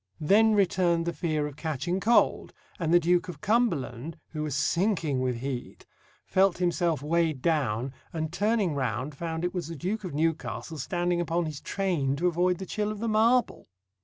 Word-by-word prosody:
Then 215 +7 +4
returned 175 -4 +2
the 170 - -1
fear 155 -4 -1
of 145 -2 -6
catching 160 +3 -2
cold; 225 +5 +2 0.3
and 165 -2 0
the 175 - +7
Duke 175 +1 +2
of 160 -5 -7
Cumberland, 165 - 0
who 155 - -5
was 150 -2 -2
sinking 170 -2 +1
with 125 -2 -1
heat, 130 -2 -5 0.4
felt 190 -2 +3
himself 175 -4 0
weighed 160 -3 0
down, 135 -6 0 0.2
and 160 -1 -3
turning 205 -2 +1
round 130 +1 -2
found 165 +3 -3
it 180 - -2
was 180 -5 -3
the 165 - -6
Duke 195 +8 -3
of 180 -6 -5
Newcastle 160 0 -2
standing 175 +4 0
upon 170 0 0
his 150 -2 -6
train 170 -9 -1
to 165 +5 -2
avoid 180 +1 +2
the 190 - -6
chill 210 +2 -2
of 215 - -5
the 230 +3 -3
marble. 230 +3 +2
170 Hz, 180 wpm, -28 LUFS, 150-185 Hz, 0.4 s, the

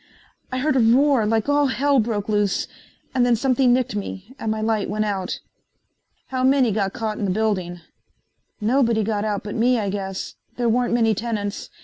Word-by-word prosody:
I 255 - -2
heard 270 +1 +1
a - - +4
roar 245 0 +4
like 225 +2 +1
all 290 0 +3
Hell 275 +1 +2
broke 215 -3 -1
loose 205 -2 0 0.5
and 255 -2 +2
then 245 -1 +4
something 255 +1 +2
nicked 250 -2 +1
me 200 +2 -6
and 220 - -3
my 220 0 -1
light 215 -1 0
went 215 +1 -1
out." 195 -3 -3 0.9
"How 255 -1 -2
many 260 -3 +4
got 195 -2 0
caught 220 -2 -3
in 205 - -1
the - - -1
building?" 185 -4 -1 0.8
"Nobody 230 0 +2
got 210 0 -1
out 205 -2 -2
but 205 - -5
me, 245 +2 +2
I 205 -3 -1
guess. 195 -1 -4 0.2
There 240 -1 +1
weren't 240 +1 +1
many 225 -2 +3
tenants. 210 -2 -4
220 Hz, 190 wpm, -22 LUFS, 205-250 Hz, 0.9 s, a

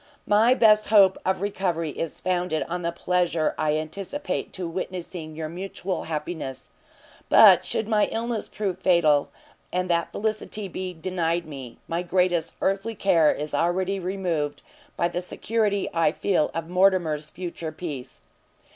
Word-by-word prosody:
my 220 +5 +4
best 215 -3 +5
hope 195 -3 +6
of 190 -1 0
recovery 180 -5 -1
is 165 +2 -5
founded 180 -3 0
on 175 +1 -3
the 170 0 -1
pleasure 170 -2 0
I 155 -1 +1
anticipate 195 - -4
to 185 -2 -4
witnessing 175 -2 -5
your 160 0 -4
mutual 185 +2 -4
happiness: 150 -4 -5 0.6
but - - +8
should 220 - -1
my 215 -2 +3
illness 230 -1 -2
prove 195 -4 -3
fatal, 165 -6 +3 0.4
and 180 0 -1
that 170 0 0
felicity 215 -1 -3
be 185 0 -5
denied 170 0 -1
me, 135 -6 -9
my 170 +1 -1
greatest 180 -2 +1
earthly 200 +4 0
care 170 -6 +4
is 150 0 -5
already 185 +5 0
removed 175 -6 -2 0.3
by 170 - +2
the 175 - -3
security 205 +1 -1
I 165 -2 +3
feel 180 -6 +1
of 165 -1 -4
Mortimer's 175 -5 +2
future 170 -2 -6
peace. 150 -6 -7
180 Hz, 145 wpm, -25 LUFS, 160-195 Hz, 0.6 s, but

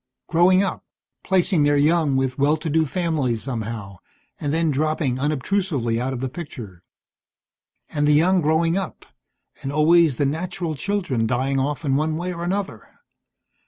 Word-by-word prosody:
Growing 180 +3 +4
up. 195 - -3 0.4
Placing 185 -2 +2
their 145 0 +3
young 150 -1 +2
with 130 -1 -1
well 145 +3 +3
to 155 0 -4
do 160 0 +2
families 145 - -1
somehow, 110 -6 -5 0.4
and 145 - -2
then 165 0 +1
dropping 145 -3 0
unobtrusively 145 - -1
out 130 +2 -2
of 130 -2 -4
the 130 - -1
picture. 120 - -9 1.1
And 145 -1 -1
the 150 - +5
young 180 +5 +4
growing 160 +2 +2
up, 195 -3 -4 0.6
and 135 -1 -4
always 155 -1 +4
the 145 - +1
natural 165 +3 -3
children 150 - -1
dying 130 +3 0
off 145 +3 -2
in 135 -1 +1
one 155 +2 0
way 180 +2 -3
or 170 0 -6
another. 195 +3 -3
150 Hz, 160 wpm, -22 LUFS, 135-170 Hz, 1.1 s, the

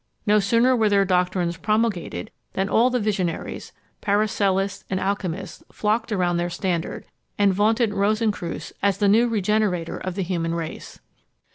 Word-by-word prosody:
No 210 0 +4
sooner 230 +5 +3
were 220 -3 +3
their 200 -1 +3
doctrines 180 -2 0
promulgated, 210 - -1 0.2
than 195 0 0
all 235 +3 +4
the 250 0 0
visionaries, 200 -6 -2 0.3
Paracelsists, 200 -2 +1
and 185 - -1
alchymists, 190 -2 -3
flocked 220 +2 -1
around 180 -4 +1
their 175 0 -1
standard, 175 -1 -3 0.3
and 200 -2 +4
vaunted 220 +3 +2
Rosencreutz 205 -3 -1
as 200 -1 +2
the 205 - +2
new 225 +4 +5
regenerator 205 -5 0
of 185 -1 -5
the 195 - -1
human 170 -2 -2
race. 165 -2 -6
200 Hz, 145 wpm, -23 LUFS, 180-215 Hz, 0.3 s, new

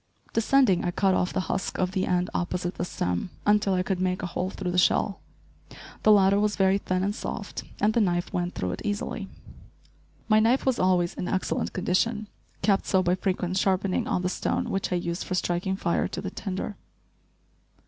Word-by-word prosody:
Descending, 230 -4 +3
I 180 - 0
cut 190 +2 +2
off 180 - +1
the 190 - 0
husk 190 - -3
of 185 0 0
the 190 -1 -1
end 180 0 0
opposite 180 0 -2
the - - -4
stem, 90 - -2 0.2
until 205 -2 +3
I 180 - +1
could 190 -1 -1
make 185 +1 0
a - - 0
hole 180 +1 -2
through 190 -2 -4
the 180 - +2
shell. 195 +2 +2 0.8
The 215 - +5
latter 200 -1 +5
was 210 0 +1
very 195 0 +3
thin 185 -1 -1
and 200 +1 0
soft, - - -5 0.2
and 215 +1 +3
the 235 - +3
knife 175 -3 0
went 175 0 -2
through 90 - -2
it - - -5
easily. 205 -1 -3 1.0
My 215 -1 +5
knife 235 +5 +3
was 260 -2 +1
always 180 -2 +2
in 180 - -4
excellent 190 - -1
condition, 210 +4 0 0.3
kept 195 0 +2
so 190 -1 +3
by 175 0 +2
frequent 185 -1 -1
sharpening 190 0 +1
on 180 - 0
the - - +1
stone - - -1
which 195 - -1
I - - +2
used 170 0 -2
for 185 - -3
striking 180 +1 0
fire 170 -3 0
to - - -5
the - - -4
tinder. 195 +1 -4
190 Hz, 200 wpm, -26 LUFS, 180-205 Hz, 1.0 s, The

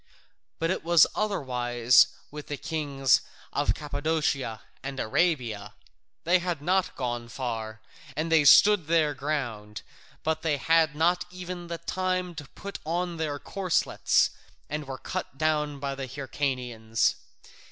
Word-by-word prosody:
But 165 +1 0
it 185 - -2
was 170 -1 +6
otherwise 125 - +3 0.2
with 150 0 -8
the 145 - -4
kings 140 -4 +1 0.3
of - - +1
Cappadocia 145 -5 -1 0.2
and 135 0 -5
Arabia; 115 -7 0 0.5
they 180 +2 +4
had 175 -3 -2
not 185 +5 +1
gone 120 -2 -3
far, 115 -4 -4 0.4
and 160 +1 -1
they 160 -2 +5
stood 200 +3 +7
their 160 -2 +3
ground, 130 -8 -4 0.4
but 160 0 0
they 155 -3 +1
had 160 0 +3
not 175 +3 +2
even 180 -1 -7 0.2
time 185 -1 -1
to 150 -3 -8
put 200 0 -7
on 170 +2 -2
their 155 -3 -2
corslets, 185 +3 +1 0.4
and 150 -1 -3
were 135 -1 -5
cut 135 - -5
down 150 -1 0
by 140 0 -2
the 135 -1 -5
Hyrcanians. 125 -4 -1
150 Hz, 130 wpm, -27 LUFS, 130-165 Hz, 0.5 s, stood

